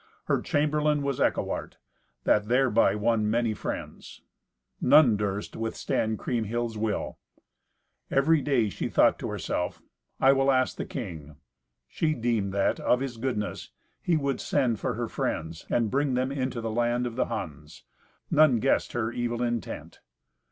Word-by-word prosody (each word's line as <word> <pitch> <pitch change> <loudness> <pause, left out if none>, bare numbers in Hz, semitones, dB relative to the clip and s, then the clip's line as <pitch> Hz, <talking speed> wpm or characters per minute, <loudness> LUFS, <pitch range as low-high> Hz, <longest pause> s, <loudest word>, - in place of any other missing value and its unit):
Her - - 0
chamberlain 150 0 +1
was 140 -2 -2
Eckewart, - - -1 0.5
that 105 0 +2
thereby 120 -5 +3
won 110 0 +1
many 115 0 +1
friends. - - -7 0.6
None 135 -4 +6
durst 105 -1 -3
withstand 110 -1 -1
Kriemhild's 115 0 -2
will. 110 0 -2 0.9
Every 145 +3 +3
day 130 -6 +2
she - - -4
thought - - +4
to - - -4
herself, 90 - -3 0.4
"I 135 +1 +6
will 135 0 +3
ask 130 -1 +1
the - - -4
king." 80 - -7 0.5
She 155 - 0
deemed 115 -5 0
that, 100 0 +1
of 125 - +2
his 130 -3 -4
goodness, 115 -3 -3 0.3
he 170 -2 +2
would 140 -3 -1
send 125 -6 +1
for 125 - -2
her 120 +1 -2
friends 80 -5 -4
and 115 -3 +1
bring 140 -1 +1
them 130 +2 0
into 130 -3 -2
the 115 -1 -3
land 120 +2 +1
of 120 -2 -4
the - - +1
Huns. 75 0 -7 0.5
None 150 -5 +5
guessed 135 +4 +1
her 115 -1 -1
evil 120 0 -2
intent. 120 -1 -4
120 Hz, 150 wpm, -27 LUFS, 110-135 Hz, 0.9 s, None